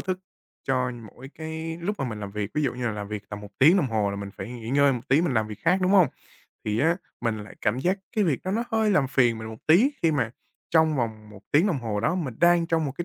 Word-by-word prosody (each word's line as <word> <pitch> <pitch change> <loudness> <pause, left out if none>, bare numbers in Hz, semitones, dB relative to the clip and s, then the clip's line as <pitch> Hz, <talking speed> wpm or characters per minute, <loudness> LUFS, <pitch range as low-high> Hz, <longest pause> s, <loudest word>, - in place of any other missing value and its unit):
thức 185 -1 -2 0.5
cho 130 -1 +1
mỗi 120 +2 -11
cái 160 +1 -5
lúc 205 +5 -3
mà - - -1
mình 105 -2 -6
làm 100 -1 -5
việc, 105 0 -4
ví 150 - +1
dụ 135 - +1
như 125 -1 -3
là 115 - 0
làm 105 -1 -5
việc 105 -1 -6
tầm 105 0 -6
1 105 -1 -10
tiếng 160 +8 +7
đồng 180 - +2
hồ 110 -4 0
là 100 - -4
mình 100 0 -6
phải 95 +4 -6
nghỉ 115 -2 -8
ngơi 140 0 +4
một 125 -2 -6
tí 135 +4 +5
mình 170 -6 0
làm 110 -1 +2
việc 105 - -8
khác, 180 +3 +4
đúng 185 - +2
hông? 190 -4 +7 0.6
Thì 105 0 -1
á 165 +7 +3 0.2
mình 115 -2 -1
lại 105 -1 -10
cảm 105 +4 0
giác 180 +8 +1 0.2
cái 210 - +3
việc 155 -8 +1
đó 185 - -2
nó 225 +4 0
hơi 220 -1 +2
làm 150 -9 +3
phiền 120 -4 +2
mình 110 0 -6
một 110 0 -9
tí 190 - +6
khi 165 - +4
mà 125 -6 0 0.4
trong 160 -2 +4
vòng 110 -4 -3
1 105 -1 -13
tiếng 155 +7 +5
đồng 175 -9 0
hồ 110 -4 -2
đó 155 +11 +1
mình 155 -10 -3
đang 175 -1 +5
trong 165 -1 +1
một 140 - -3
cái 175 - -2
130 Hz, 290 wpm, -26 LUFS, 110-165 Hz, 0.6 s, tiếng